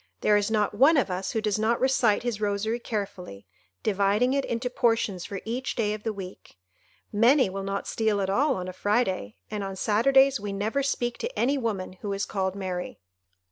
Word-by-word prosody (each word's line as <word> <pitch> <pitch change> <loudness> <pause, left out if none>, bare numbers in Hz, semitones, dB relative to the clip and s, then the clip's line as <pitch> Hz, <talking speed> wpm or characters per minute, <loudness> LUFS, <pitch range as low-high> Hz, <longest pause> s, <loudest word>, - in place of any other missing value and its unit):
There 210 - +4
is 205 0 +2
not 210 -2 +1
one 275 +9 +5
of 250 -8 +1
us 185 +1 -3
who 220 - 0
does 215 -1 0
not 225 +2 +1
recite 250 -5 +2
his 235 -4 -3
rosary 210 +3 -1
carefully, 195 - -5 0.4
dividing 210 +5 +2
it 275 0 +1
into 235 +2 -2
portions 225 -7 0
for 195 -2 -6
each 245 +4 -3
day 210 -3 0
of 215 - -6
the 220 - -2
week. 190 - -10 0.5
Many 235 +1 +4
will 195 +1 -4
not 195 +1 -3
steal 220 -2 0
at 195 - 0
all 270 +9 +2
on 180 -1 -4
a 185 - -6
Friday, 190 - 0 0.2
and 210 -1 -3
on 195 0 -5
Saturdays 265 +7 +4
we 200 -1 -4
never 215 +7 -1
speak 240 -3 -1
to 485 +2 -5
any 270 +4 +2
woman 215 -8 -3
who 205 -1 -3
is 195 +1 -2
called 190 -1 -2
Mary." 185 -2 -4
210 Hz, 200 wpm, -26 LUFS, 195-240 Hz, 0.5 s, one